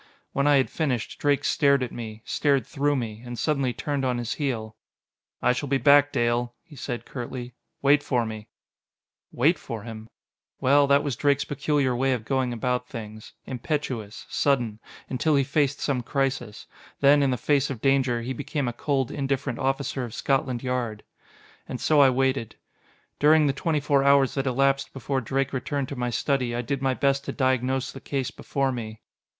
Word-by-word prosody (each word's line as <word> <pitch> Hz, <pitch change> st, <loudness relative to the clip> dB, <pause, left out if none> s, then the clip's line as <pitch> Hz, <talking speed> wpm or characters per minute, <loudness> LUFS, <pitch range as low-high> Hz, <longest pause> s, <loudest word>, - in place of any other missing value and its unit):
When 140 Hz, +1 st, +1 dB
I 145 Hz, -, +6 dB
had 130 Hz, -, +1 dB
finished. 130 Hz, -9 st, -2 dB
Drake 145 Hz, -1 st, +2 dB
stared 140 Hz, -2 st, +3 dB
at 125 Hz, -, -4 dB
me 110 Hz, -2 st, -7 dB
stared 140 Hz, -3 st, +1 dB
through 145 Hz, +1 st, 0 dB
me 115 Hz, -4 st, -4 dB
and 120 Hz, -1 st, -7 dB
suddenly 135 Hz, 0 st, 0 dB
turned 140 Hz, +2 st, -3 dB
on 125 Hz, -2 st, 0 dB
his 120 Hz, -1 st, -2 dB
heel. 115 Hz, -7 st, -3 dB, 0.7 s
"I 125 Hz, -, +4 dB
shall 140 Hz, +2 st, -4 dB
be 135 Hz, -, +3 dB
back, 145 Hz, +1 st, +5 dB
Dale," 120 Hz, 0 st, 0 dB
he 170 Hz, -3 st, -15 dB
said 125 Hz, -2 st, -5 dB
curtly. 125 Hz, -1 st, -6 dB, 0.3 s
"Wait 145 Hz, +1 st, +5 dB
for 125 Hz, -5 st, 0 dB
me!" 110 Hz, -1 st, -7 dB, 0.8 s
Wait 155 Hz, +8 st, +2 dB
for 115 Hz, -3 st, -6 dB
him! 110 Hz, -1 st, -9 dB, 0.5 s
Well, 140 Hz, +2 st, +4 dB
that 140 Hz, 0 st, +4 dB
was 140 Hz, -4 st, -2 dB
Drake's 140 Hz, +3 st, +2 dB
peculiar 145 Hz, -2 st, 0 dB
way 135 Hz, +2 st, +2 dB
of 115 Hz, -3 st, -4 dB
going 130 Hz, -1 st, 0 dB
about 125 Hz, +1 st, -1 dB
things. 110 Hz, -3 st, -8 dB
Impetuous, 125 Hz, -5 st, -4 dB
sudden 120 Hz, -7 st, 0 dB, 0.3 s
until 145 Hz, +4 st, +1 dB
he 140 Hz, -, +4 dB
faced 140 Hz, 0 st, 0 dB
some 135 Hz, -4 st, 0 dB
crisis. 135 Hz, -4 st, -2 dB, 0.4 s
Then, 145 Hz, +1 st, +6 dB
in 140 Hz, -, +3 dB
the 125 Hz, -, 0 dB
face 145 Hz, +3 st, +1 dB
of 130 Hz, -5 st, -4 dB
danger, 130 Hz, -2 st, +2 dB
he 130 Hz, +2 st, -3 dB
became 140 Hz, +2 st, -3 dB
a 120 Hz, -, -2 dB
cold, 135 Hz, 0 st, -1 dB
indifferent 135 Hz, -2 st, -2 dB
officer 135 Hz, 0 st, -1 dB
of 120 Hz, -3 st, -6 dB
Scotland 130 Hz, -3 st, 0 dB
Yard. 120 Hz, -4 st, -2 dB, 0.7 s
And 125 Hz, -, -4 dB
so 155 Hz, -2 st, +3 dB
I 135 Hz, -, +7 dB
waited. 130 Hz, -2 st, 0 dB, 0.6 s
During 155 Hz, +1 st, +5 dB
the 140 Hz, -, +2 dB
twenty 155 Hz, +3 st, 0 dB
four 140 Hz, -1 st, +2 dB
hours 140 Hz, -1 st, +4 dB
that 135 Hz, -1 st, -1 dB
elapsed 135 Hz, +2 st, +1 dB
before 135 Hz, 0 st, -2 dB
Drake 135 Hz, +3 st, -1 dB
returned 135 Hz, +1 st, -2 dB
to 140 Hz, -, -5 dB
my 125 Hz, -1 st, -2 dB
study, 125 Hz, -1 st, 0 dB
I 120 Hz, -, -2 dB
did 135 Hz, +2 st, -2 dB
my 135 Hz, -1 st, +1 dB
best 140 Hz, 0 st, +1 dB
to -, -, -3 dB
diagnose 130 Hz, 0 st, 0 dB
the 135 Hz, -, -10 dB
case 135 Hz, -2 st, -2 dB
before 135 Hz, -1 st, -1 dB
me. 110 Hz, -3 st, -6 dB
135 Hz, 185 wpm, -25 LUFS, 120-140 Hz, 0.8 s, I